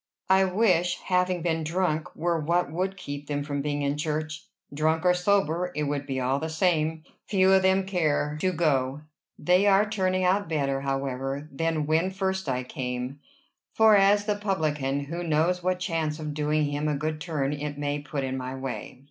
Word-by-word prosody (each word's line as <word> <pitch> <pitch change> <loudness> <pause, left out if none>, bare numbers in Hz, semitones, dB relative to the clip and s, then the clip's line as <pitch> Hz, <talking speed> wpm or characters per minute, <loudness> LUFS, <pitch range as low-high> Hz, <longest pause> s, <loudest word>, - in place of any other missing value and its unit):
"I 190 0 +6
wish 180 -3 +2
having 180 -2 0
been 165 -2 0
drunk 160 -1 -1
were 170 0 0
what 170 0 0
would 190 +4 -2
keep 145 -4 -7
them 145 -1 -2
from 145 -1 -3
being 145 0 -2
in 140 +1 0
church. 155 +2 -3 0.3
Drunk 160 +3 +1
or 180 - +6
sober, 180 -2 +1
it 150 - -1
would 145 -1 -2
be 135 -1 -2
all 130 +2 0
the 160 - -3
same. 160 -1 +1 0.2
Few 190 -2 +3
of 190 0 +6
them 190 0 +3
care 155 -5 0
to 185 - +2
go. 145 -5 0 0.4
They 180 +3 +3
are 200 +1 +5
turning 185 -3 0
out 185 0 +2
better, 140 -4 0
however, 135 +1 -3
than 160 +1 -1
when 160 +4 +2
first 190 -3 -2
I 130 0 -1
came. 125 +2 -4 0.6
As 205 -2 +6
for 210 - +1
the 205 - -8
publican, 150 -9 -1
who 165 +5 -5
knows 170 +3 +1
what 185 +1 0
chance 165 -4 -2
of 155 -2 -5
doing 150 0 +1
him 145 +1 -2
a 150 - +1
good 155 +2 -3
turn 145 -4 -1
it 145 0 -4
may 145 0 -2
put 145 -1 -4
in 130 0 -2
my 130 0 -4
way?" 130 -1 -6
155 Hz, 190 wpm, -26 LUFS, 145-180 Hz, 0.6 s, I